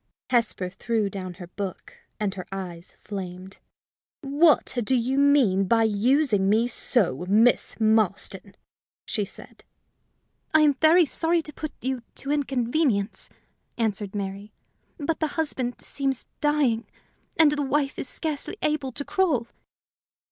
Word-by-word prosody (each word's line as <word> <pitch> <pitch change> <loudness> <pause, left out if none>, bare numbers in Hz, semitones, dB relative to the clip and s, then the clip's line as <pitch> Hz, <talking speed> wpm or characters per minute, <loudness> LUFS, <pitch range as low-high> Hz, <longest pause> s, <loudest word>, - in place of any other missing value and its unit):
Hesper 230 -6 +1
threw 215 +1 -1
down 185 -2 -6
her 180 -1 -9
book, 185 +1 -7 0.2
and 205 -2 -1
her 185 -3 -7
eyes 180 -3 -7
flamed. 190 -2 -7 0.6
"What 290 +1 +3
do 260 +5 +2
you 255 +3 +1
mean 265 -10 +4
by 225 +4 +3
using 220 -1 +2
me 220 +3 +3
so, 205 - 0
Miss 225 +5 +3
Marston?" 215 -3 +1 0.5
she 210 - -1
said. - - -11 0.9
"I 315 - +7
am 295 -2 +5
very 320 +5 +5
sorry 330 +3 0
to 300 - -8
put 310 - -5
you 260 -1 -2
to 275 - -5
inconvenience," 260 -5 0 0.5
answered 210 -3 -2
Mary; 200 +1 -5 0.5
"but 315 +1 -2
the 315 - +1
husband 260 -6 -1
seems 270 -2 -1
dying, 285 -7 +1 0.5
and 315 -3 +6
the 295 0 -1
wife 280 0 0
is 265 - -3
scarcely 310 +5 -3
able 300 -3 0
to 285 - -3
crawl." 320 -12 +1
240 Hz, 135 wpm, -25 LUFS, 200-290 Hz, 0.9 s, I